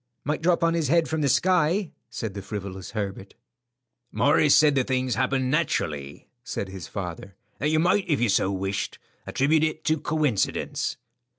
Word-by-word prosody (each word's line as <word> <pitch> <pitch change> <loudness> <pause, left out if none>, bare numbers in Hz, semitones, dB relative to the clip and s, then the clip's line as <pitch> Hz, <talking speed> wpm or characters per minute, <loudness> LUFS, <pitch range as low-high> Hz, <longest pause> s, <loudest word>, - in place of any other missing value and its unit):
"Might 150 +3 -2
drop 170 0 +2
on 165 0 +3
his 165 -3 0
head 165 +3 +3
from 160 0 -1
the 140 - +2
sky," 180 +3 +2 0.2
said 110 -3 -5
the 100 - -6
frivolous 95 -1 -7
Herbert. 100 -2 -5 0.8
"Morris 145 0 +4
said 150 0 +5
the 135 -2 +2
things 130 -1 0
happened 130 0 +1
so 130 - -1
naturally," 75 - -1 0.2
said 95 - -4
his 95 -2 -8
father, 95 0 -6 0.2
"that 150 - +1
you 155 - +2
might 180 +5 +2
if 150 - +2
you 120 - +2
so 95 0 +2
wished 95 0 -3 0.3
attribute 155 +3 +2
it 155 0 -1
to 155 0 +1
coincidence." 150 -10 -1
135 Hz, 175 wpm, -25 LUFS, 100-155 Hz, 0.8 s, said